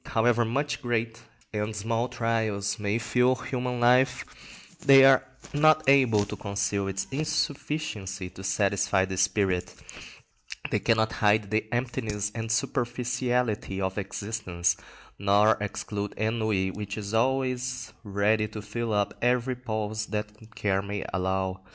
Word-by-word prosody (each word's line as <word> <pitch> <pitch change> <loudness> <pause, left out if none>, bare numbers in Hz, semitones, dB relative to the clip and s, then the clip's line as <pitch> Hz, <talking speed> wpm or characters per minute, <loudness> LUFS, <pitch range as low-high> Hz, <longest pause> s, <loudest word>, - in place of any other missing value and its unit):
But - - -11
however 120 +1 +3
much 140 +6 -1
great 120 -2 -2 0.3
and 105 0 -2
small 115 +3 -1
trials 110 -3 -1
may 105 +1 0
fill 125 +2 +2
human 125 -1 -3
life, 125 +2 +3 0.6
they 135 -1 +8
are 135 -1 +6 0.3
not 155 +1 +4
able 125 -7 +5
to - - -6
conceal 100 -1 -2
its 95 0 -2
insufficiency 145 - -2
to 95 - -11
satisfy 100 -1 +1
the 95 0 -4
spirit; 95 -1 +1 1.0
they - - +2
cannot 110 -1 +2
hide 105 -1 +2
the 110 0 -1
emptiness 115 -4 -2
and 115 -1 -4
superficiality 120 -4 -1
of 95 +1 -2
existence, 95 -4 -2 0.4
nor 100 +2 +4
exclude 105 0 -4
ennui, 110 -4 0
which 105 +1 -6
is 105 0 -5
always 125 +1 0
ready 105 +1 +1
to 105 0 -7
fill 115 +2 -3
up 105 -1 +1
every 125 +1 +1
pause 110 -3 -3
that 105 +1 -6
care 95 -2 0
may 100 0 -4
allow. 95 0 -1
110 Hz, 130 wpm, -27 LUFS, 100-125 Hz, 1.0 s, they